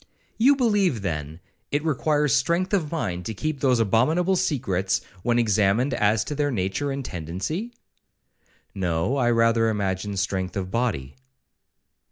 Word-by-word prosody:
'You 270 Hz, +5 st, +6 dB
believe, 205 Hz, -, +1 dB
then, 80 Hz, -1 st, -4 dB, 0.3 s
it 145 Hz, +2 st, -1 dB
requires 150 Hz, -2 st, +1 dB
strength 170 Hz, +8 st, 0 dB
of 165 Hz, -7 st, 0 dB
mind 90 Hz, -, -2 dB
to 110 Hz, -, -4 dB
keep 155 Hz, +6 st, -3 dB
those 130 Hz, -3 st, +2 dB
abominable 155 Hz, -, +2 dB
secrets, 95 Hz, -, 0 dB, 0.2 s
when 120 Hz, +3 st, +1 dB
examined 110 Hz, +3 st, +2 dB
as 105 Hz, -1 st, +2 dB
to -, -, -5 dB
their 145 Hz, 0 st, 0 dB
nature 105 Hz, +4 st, -1 dB
and 135 Hz, -1 st, -4 dB
tendency?'—'No, 95 Hz, -, -4 dB, 1.5 s
I 120 Hz, -3 st, +2 dB
rather 115 Hz, -1 st, +3 dB
imagine 100 Hz, -1 st, -2 dB
strength 95 Hz, -1 st, -2 dB
of 95 Hz, -1 st, -4 dB
body.' 105 Hz, -, -2 dB
115 Hz, 135 wpm, -24 LUFS, 95-150 Hz, 1.5 s, You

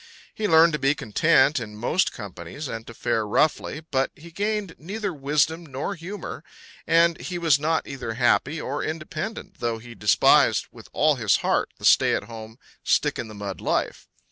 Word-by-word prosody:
He 215 Hz, -, -2 dB
learned 165 Hz, -1 st, +6 dB
to 150 Hz, -, -1 dB
be 135 Hz, +2 st, +2 dB
content 140 Hz, +4 st, +3 dB
in 105 Hz, -3 st, -8 dB
most 150 Hz, +12 st, +1 dB
companies 95 Hz, -, -8 dB
and 115 Hz, -2 st, -6 dB
to 115 Hz, -, -9 dB
fare 115 Hz, -2 st, 0 dB
roughly; 150 Hz, +5 st, 0 dB
but 135 Hz, 0 st, +1 dB
he 170 Hz, +2 st, -13 dB
gained 205 Hz, -1 st, -2 dB
neither 200 Hz, +4 st, -4 dB
wisdom 150 Hz, +3 st, 0 dB
nor 145 Hz, +5 st, -4 dB
humour, 180 Hz, -2 st, -7 dB, 0.4 s
and 170 Hz, 0 st, +3 dB
he 180 Hz, -, -4 dB
was 165 Hz, -5 st, +3 dB
not 160 Hz, +2 st, 0 dB
either 125 Hz, -5 st, -5 dB
happy 125 Hz, +5 st, +2 dB
or 140 Hz, +1 st, -3 dB
independent, 155 Hz, +6 st, -5 dB
though 115 Hz, -1 st, -1 dB
he 120 Hz, +1 st, -11 dB
despised 105 Hz, -4 st, +4 dB
with -, -, -14 dB
all 150 Hz, -2 st, +2 dB
his 110 Hz, -5 st, +3 dB
heart -, -, +1 dB
the -, -, -7 dB
stay -, -, +5 dB
at -, -, -3 dB
home, 110 Hz, 0 st, -10 dB, 0.3 s
stick -, -, +1 dB
in 120 Hz, -, -4 dB
the 110 Hz, -, -10 dB
mud 100 Hz, -2 st, -6 dB
life. -, -, -2 dB
145 Hz, 180 wpm, -24 LUFS, 115-165 Hz, 0.4 s, learned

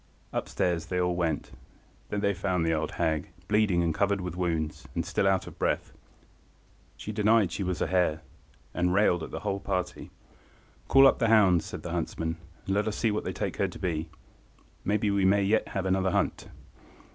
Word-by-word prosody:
Up–stairs 85 Hz, -2 st, -1 dB
they 90 Hz, +1 st, -1 dB
all 90 Hz, -1 st, +1 dB
went. 85 Hz, -4 st, -1 dB, 0.6 s
There 105 Hz, -, -2 dB
they 100 Hz, 0 st, +1 dB
found 90 Hz, -2 st, -1 dB
the 80 Hz, -, +2 dB
old 80 Hz, -1 st, -2 dB
hag, 80 Hz, -2 st, -1 dB, 0.2 s
bleeding 105 Hz, -5 st, +3 dB
and 85 Hz, -1 st, +1 dB
covered 100 Hz, +3 st, +1 dB
with 90 Hz, -2 st, -5 dB
wounds, 80 Hz, -4 st, -2 dB
and -, -, -1 dB
still 95 Hz, -, +1 dB
out 95 Hz, -1 st, +2 dB
of -, -, -12 dB
breath. -, -, -1 dB, 1.0 s
She 105 Hz, -, -6 dB
denied 105 Hz, -2 st, +3 dB
she 100 Hz, -, -4 dB
was 90 Hz, -1 st, -1 dB
a -, -, +1 dB
hare, 90 Hz, -4 st, +1 dB, 0.5 s
and 90 Hz, +1 st, +1 dB
railed 95 Hz, -4 st, +3 dB
at -, -, -5 dB
the -, -, -6 dB
whole 100 Hz, -2 st, -2 dB
party. 95 Hz, -2 st, -3 dB, 0.8 s
"Call 135 Hz, 0 st, +7 dB
up -, -, +5 dB
the 115 Hz, -, +2 dB
hounds," 100 Hz, -7 st, +5 dB
said -, -, -7 dB
the -, -, -5 dB
huntsman, 80 Hz, 0 st, -2 dB, 0.3 s
"and 95 Hz, -, -1 dB
let 105 Hz, +2 st, +1 dB
us 110 Hz, -, -2 dB
see 115 Hz, -, +1 dB
what 105 Hz, -, -2 dB
they -, -, -1 dB
take -, -, -3 dB
her -, -, +1 dB
to -, -, -9 dB
be. 80 Hz, -2 st, -2 dB, 0.7 s
Maybe 105 Hz, 0 st, +1 dB
we 100 Hz, -1 st, +1 dB
may 100 Hz, +1 st, +4 dB
yet 105 Hz, +3 st, +2 dB
have 95 Hz, -1 st, -3 dB
another 95 Hz, 0 st, +2 dB
hunt." -, -, -1 dB
95 Hz, 195 wpm, -28 LUFS, 85-100 Hz, 1.0 s, Call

